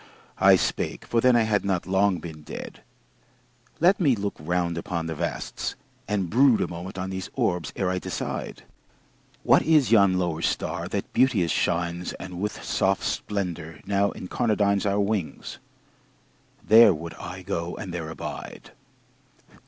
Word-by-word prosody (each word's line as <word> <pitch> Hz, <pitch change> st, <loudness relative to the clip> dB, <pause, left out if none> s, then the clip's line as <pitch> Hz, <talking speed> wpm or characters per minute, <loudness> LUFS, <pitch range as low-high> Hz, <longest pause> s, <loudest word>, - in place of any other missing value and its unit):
I -, -, +7 dB
spake -, -, -2 dB
for 115 Hz, -, +1 dB
then 125 Hz, 0 st, +5 dB
I 115 Hz, -, +4 dB
had 105 Hz, -2 st, +1 dB
not 95 Hz, -3 st, -1 dB
long 95 Hz, 0 st, +2 dB
been 80 Hz, -3 st, -9 dB
dead -, -, -8 dB, 1.0 s
"Let 180 Hz, +4 st, +4 dB
me 145 Hz, -9 st, +3 dB
look 100 Hz, -1 st, -3 dB
round 85 Hz, +2 st, -1 dB
upon 85 Hz, 0 st, -3 dB
the 80 Hz, -, -3 dB
vasts, 75 Hz, -, -4 dB, 0.3 s
and 100 Hz, -3 st, 0 dB
brood 125 Hz, +4 st, +4 dB
A -, -, 0 dB
moment 90 Hz, +3 st, -7 dB
on 95 Hz, +1 st, -3 dB
these 95 Hz, -1 st, -5 dB
orbs 90 Hz, -4 st, 0 dB
ere 95 Hz, -2 st, 0 dB
I 90 Hz, -, -1 dB
decide... -, -, -5 dB, 0.8 s
What -, -, +5 dB
is 155 Hz, -7 st, +3 dB
yon 100 Hz, -4 st, +5 dB
lower 85 Hz, -3 st, -1 dB
star -, -, -2 dB
that -, -, -4 dB
beauteous 105 Hz, -, +3 dB
shines 85 Hz, +1 st, -1 dB
And 90 Hz, -1 st, -7 dB
with 105 Hz, 0 st, -3 dB
soft 95 Hz, 0 st, +1 dB
splendor 85 Hz, -6 st, -3 dB
now 100 Hz, 0 st, +2 dB
incarnadines 100 Hz, 0 st, 0 dB
Our 100 Hz, +1 st, +1 dB
wings? 100 Hz, -4 st, -2 dB, 1.1 s
There 110 Hz, -4 st, +8 dB
would 80 Hz, +1 st, -7 dB
I -, -, -7 dB
go 85 Hz, +1 st, -3 dB
and 95 Hz, -4 st, -6 dB
there 85 Hz, -2 st, -4 dB
abide." 80 Hz, -, -8 dB
95 Hz, 150 wpm, -25 LUFS, 85-105 Hz, 1.1 s, There